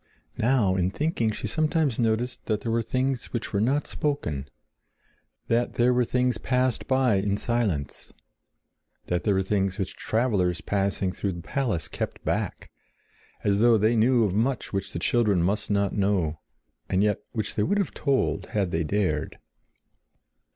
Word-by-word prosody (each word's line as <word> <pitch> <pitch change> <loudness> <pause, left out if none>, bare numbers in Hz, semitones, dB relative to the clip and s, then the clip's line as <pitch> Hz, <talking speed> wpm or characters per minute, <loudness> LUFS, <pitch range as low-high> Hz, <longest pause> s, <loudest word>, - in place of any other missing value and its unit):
Now, 110 -5 +3
in 90 -1 +1
thinking, 130 - 0
she 105 - -4
sometimes 155 -5 +1
noticed 115 +2 0
that 105 -2 0
there 115 - -2
were 115 +1 +2
things 130 +3 -1
which 120 -3 -5
were 100 - +1
not 135 +6 +1
spoken; 75 - -2 1.0
that 120 +1 +1
there 125 +1 +3
were 125 0 +2
things 125 -2 0
passed 125 -1 0
by 130 -5 +3
in 100 +1 0
silence; 105 - -2 0.9
that 90 -1 -2
there 100 - +3
were 95 - +2
things 95 -1 0
which 95 -3 -3
travelers 100 -7 0
passing 95 -1 -1
through 95 0 -3
the 85 -1 -8
palace 115 -11 -1
kept - - -5
back, - - -2 0.7
as 100 0 +2
though 115 0 +5
they 110 +3 +3
knew 120 +2 +4
of 100 -4 0
much 120 +4 -1
which 100 0 -2
the - - -4
children 105 -7 +2
must 100 +4 0
not 100 -1 +1
know, 95 -6 +1 0.5
and 95 +2 +2
yet 105 -2 +1
which 110 -4 -2
they 105 - -1
would 200 - +1
have 200 -4 -1
told 140 -3 0
had 100 -4 -1
they 80 0 0
dared. 85 -3 -1
110 Hz, 165 wpm, -26 LUFS, 95-125 Hz, 1.0 s, though